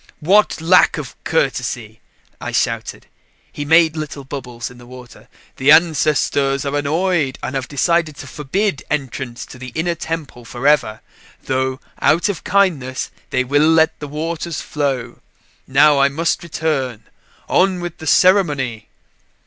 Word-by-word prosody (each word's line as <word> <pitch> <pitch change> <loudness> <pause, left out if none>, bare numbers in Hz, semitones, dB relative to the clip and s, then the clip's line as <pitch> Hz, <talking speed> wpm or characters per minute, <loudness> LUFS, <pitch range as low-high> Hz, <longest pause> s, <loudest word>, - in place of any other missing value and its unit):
"What 195 +6 +3
lack 175 +3 +4
of - - -7
courtesy!" - - -2 0.4
I - - -4
shouted. - - -2 0.5
He 145 - -5
made 160 +1 +4
little 150 -2 -5
bubbles 125 -4 -7
in 125 - -15
the 120 - -14
water. 125 -1 -13 0.3
"The 135 +2 +1
ancestors 145 -3 +3
are 140 +1 -2
annoyed 155 -1 0
and - - -3
have 135 -2 -3
decided 160 +1 +1
to - - -8
forbid 155 +3 -2
entrance 130 -3 -4
to 125 - -13
the 130 - -8
Inner 170 +2 0
Temple 160 -6 -6
forever; 120 -1 +1 0.4
though, 130 0 -1 0.2
out 175 +6 +3
of 195 - -4
kindness, 180 -10 0 0.2
they 130 - +1
will 145 +4 +3
let 160 0 +3
the 150 - -6
waters 160 +2 -4
flow. 135 -5 -3 0.5
Now 145 +1 +5
I 140 - +5
must 165 +4 -1
return 145 -9 -2 0.4
on 185 0 +2
with 175 -2 -6
the 160 - -8
ceremony!" 145 - +2
145 Hz, 140 wpm, -19 LUFS, 130-165 Hz, 0.5 s, Now